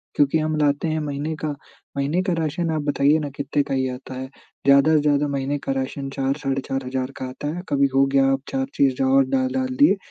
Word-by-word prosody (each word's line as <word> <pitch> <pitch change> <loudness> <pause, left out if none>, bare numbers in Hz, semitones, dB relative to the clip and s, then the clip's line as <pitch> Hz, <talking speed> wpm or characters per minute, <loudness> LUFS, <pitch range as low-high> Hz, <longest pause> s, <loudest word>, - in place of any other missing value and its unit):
क्योंकि 145 +2 +3
हम 155 0 -1
लाते 145 +1 +1
हैं 155 0 0
महीने 150 +2 -3
का 155 - -3 0.5
महीने 145 +6 +1
का 185 -2 0
राशन 165 +1 -1
आप 155 -1 -1
बताइए 145 +1 +3
ना 150 -2 -3
कितने 140 +1 -1
का 140 - -4
ही 130 0 +1
आता 125 +1 -8
है? 130 +1 -5 0.4
ज़्यादा 140 +3 +6
से 155 - +5
ज़्यादा 145 0 +2
महीने 140 +1 -1
का - - -2
राशन 135 +1 -3
4 135 0 0
साढ़े 135 -1 -1
4,000 130 0 -3
का - - -4
आता 130 +3 -6
है। 180 - -6
कभी 140 -1 +3
हो 135 0 +5
गया 135 -1 +5
आप 135 - -1
4 265 0 -1
चीज़ 135 -2 +2
और 135 +1 +4
डाल 130 -1 +1
डाल 130 0 0
दिए 170 +8 +6
140 Hz, 230 wpm, -23 LUFS, 135-150 Hz, 0.5 s, ज़्यादा